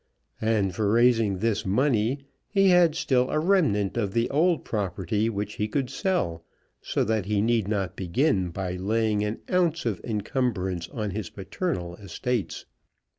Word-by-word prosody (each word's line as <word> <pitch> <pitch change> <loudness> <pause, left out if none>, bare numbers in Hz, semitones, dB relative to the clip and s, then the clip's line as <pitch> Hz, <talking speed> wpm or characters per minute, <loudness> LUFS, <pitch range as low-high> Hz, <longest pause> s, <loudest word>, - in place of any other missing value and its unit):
And 110 -4 +1
for 105 +2 0
raising 115 -4 +3
this 110 +1 0
money 125 +4 +1 0.3
he 195 -2 +4
had 175 -3 +5
still 130 -5 +1
a - - 0
remnant 155 - +2
of 100 -4 -1
the 115 0 +2
old 165 +1 +2
property 105 +1 -1
which 105 -1 -4
he 105 - +1
could 130 +3 -2
sell, 135 - -1 0.4
so - - 0
that 110 -3 -1
he 105 -1 +1
need 110 -1 +2
not 100 -4 -1
begin 95 - +1
by 90 +1 -4
laying 105 +2 +1
an 105 +2 -3
ounce 170 -4 +1
of 110 -6 -1
encumbrance 100 -6 -2
on 105 -3 -3
his 100 -2 -4
paternal 95 - -4
estates. 105 +3 -3
110 Hz, 155 wpm, -26 LUFS, 100-130 Hz, 0.4 s, had